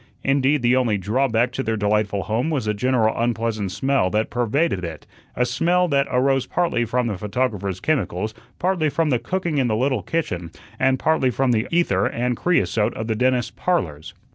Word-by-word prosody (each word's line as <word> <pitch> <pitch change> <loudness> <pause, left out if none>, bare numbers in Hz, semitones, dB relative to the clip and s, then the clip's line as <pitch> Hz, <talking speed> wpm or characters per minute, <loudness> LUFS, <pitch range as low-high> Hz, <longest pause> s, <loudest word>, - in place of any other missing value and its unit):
Indeed, 135 0 +2
the 120 +1 +4
only 120 -5 +2
drawback 120 +4 +1
to 135 - -3
their 110 -3 -1
delightful 105 -1 0
home 115 - -1
was 145 -8 -1
the 105 - 0
general 115 0 +1
unpleasant 115 -4 -1
smell 120 -1 +1
that 105 +3 -1
pervaded 120 - 0
it 80 -3 -6 0.3
a 125 - +2
smell 175 +8 +1
that 140 -2 +2
arose 135 +1 +1
partly 170 -9 0
from 125 +2 0
the 105 -6 -3
photographer's 105 -4 -2
chemicals, 110 - -1 0.2
partly 175 -4 +1
from 160 +1 0
the 125 - +2
cooking 175 -3 -2
in 130 - +2
the 110 - +1
little 130 -2 +1
kitchen, 90 - -3 0.3
and 130 0 +3
partly 155 -2 +2
from 130 +1 +1
the 115 +1 +1
ether 135 - +2
and 125 +1 -1
creosote 110 - +1
of 110 - -4
the 110 - -1
dentist's 125 +1 +1
"Parlors." 80 - -2
120 Hz, 185 wpm, -22 LUFS, 105-135 Hz, 0.3 s, the